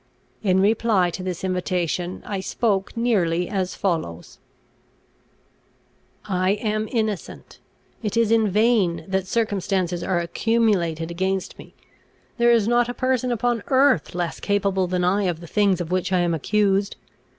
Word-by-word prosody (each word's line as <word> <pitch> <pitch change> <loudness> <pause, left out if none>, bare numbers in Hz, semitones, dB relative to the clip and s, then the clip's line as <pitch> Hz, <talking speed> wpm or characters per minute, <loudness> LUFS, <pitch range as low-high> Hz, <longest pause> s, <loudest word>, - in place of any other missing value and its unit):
In 190 -3 +2
reply 205 -3 +2
to 185 - -6
this 185 -1 -5
invitation, 180 -1 -2
I 200 -2 -3
spoke 195 +1 -1
nearly 180 -8 +1
as 190 -3 -2
follows: 160 - -3 1.9
"I 185 -1 +1
am 215 0 -2
innocent. 215 -6 -3 0.4
It 215 0 -2
is 230 -1 +3
in 225 -2 +3
vain 210 -4 +2
that 190 -1 -1
circumstances 190 -5 -1
are 185 - 0
accumulated 170 -4 0
against 190 +2 -2
me; - - -13 0.6
there 240 0 +5
is 225 -3 +3
not 240 0 +2
a 245 - -4
person 255 -1 0
upon 240 -1 0
earth 265 -7 +3
less 175 -2 -3
capable 200 -2 0
than 180 0 -1
I 195 +3 +2
of 175 -3 -1
the 170 - -10
things 200 +1 +1
of 175 -1 -4
which 185 +1 -1
I 180 -1 +3
am 175 -1 +1
accused. 200 +4 +1
195 Hz, 145 wpm, -23 LUFS, 180-220 Hz, 1.9 s, there